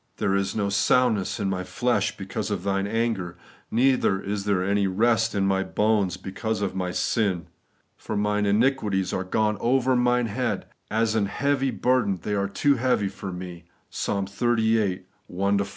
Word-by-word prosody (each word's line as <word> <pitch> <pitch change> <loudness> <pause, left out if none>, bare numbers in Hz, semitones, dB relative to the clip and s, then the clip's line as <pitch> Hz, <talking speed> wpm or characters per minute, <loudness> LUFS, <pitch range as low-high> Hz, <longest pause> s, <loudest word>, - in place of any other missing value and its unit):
There 95 - 0
is 100 0 0
no 100 -2 0
soundness 110 0 +2
in 100 - -1
my 95 -1 -2
flesh 100 +3 0
because 100 +1 -4
of 100 -4 -3
Thine 100 0 0
anger, 105 -6 -1 0.3
neither 125 -5 +2
is 100 0 -4
there 100 -3 +1
any 100 +1 +1
rest 115 +3 +2
in 100 -1 +1
my 95 0 +2
bones 105 -2 +1
because 105 +3 -3
of 95 - -2
my 95 -1 -2
sin. 90 -2 0 0.5
For 110 - -4
mine 105 0 +1
iniquities 105 -4 +1
are 95 - -1
gone 105 +3 0
over 130 +2 +2
mine 125 0 +2
head; 110 -1 -2 0.2
as 110 0 +1
an 105 -3 +1
heavy 135 +4 0
burden, 125 -7 +1
they 105 - -2
are 100 -1 0
too 140 +6 +2
heavy 120 -5 +1
for 95 0 -7
me 90 -1 -8
' - - -42
(Ps. - - -3
xxxviii. 110 -1 +1 0.2
1 100 +2 0
4).. 100 - -1
105 Hz, 175 wpm, -25 LUFS, 95-115 Hz, 0.5 s, soundness